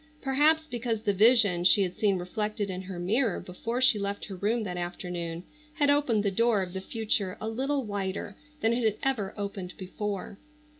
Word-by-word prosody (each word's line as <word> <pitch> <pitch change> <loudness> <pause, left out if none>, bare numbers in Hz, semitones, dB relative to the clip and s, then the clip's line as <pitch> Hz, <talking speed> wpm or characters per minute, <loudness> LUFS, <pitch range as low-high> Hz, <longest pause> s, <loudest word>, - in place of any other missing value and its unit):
Perhaps 295 +4 +3
because 235 -5 -3
the 205 -3 +2
vision 205 -4 +5
she 195 +2 +6
had 180 -1 -3
seen 200 -3 +2
reflected 205 +3 -2
in 185 0 -4
her 190 -1 -7
mirror 205 +4 +1
before 230 +7 -4
she 255 -5 +5
left 200 0 -3
her 195 - -7
room 215 +5 0
that 180 -3 -4
afternoon 175 -1 -4 0.3
had 290 -2 +3
opened 260 -8 +2
the 200 - +1
door 225 0 +2
of 180 -1 -7
the 190 - -4
future 210 -3 -1
a 220 - -4
little 270 +5 -1
wider 200 -2 -4 0.3
than 225 +1 +3
it 240 0 0
had 215 -2 +2
ever 230 -8 0
opened 200 -3 -5
before. 200 +1 -5
205 Hz, 190 wpm, -28 LUFS, 185-235 Hz, 0.3 s, she